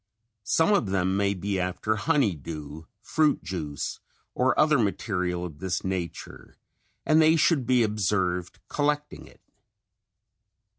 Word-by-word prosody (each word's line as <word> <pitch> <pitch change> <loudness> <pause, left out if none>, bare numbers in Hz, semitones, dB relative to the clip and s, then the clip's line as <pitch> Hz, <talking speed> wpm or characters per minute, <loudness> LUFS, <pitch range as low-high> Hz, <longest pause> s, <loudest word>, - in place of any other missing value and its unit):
Some 160 - +3
of 165 - +2
them 95 0 0
may 100 0 +1
be 95 +1 -2
after 90 +4 -1
honey 110 +1 +2
dew, 75 +1 -8 0.2
fruit 155 +5 +1
juice 75 -6 -4 0.3
or 125 0 +1
other 150 -3 +4
material 90 -4 -1
of 80 -4 -9
this 95 0 -2
nature 95 -3 -5 0.5
and 155 +1 +5
they 160 +1 +5
should 150 -5 +2
be 125 -2 +4
observed 95 -4 -1
collecting 150 0 -2
it. - - -20
100 Hz, 130 wpm, -26 LUFS, 90-130 Hz, 0.5 s, and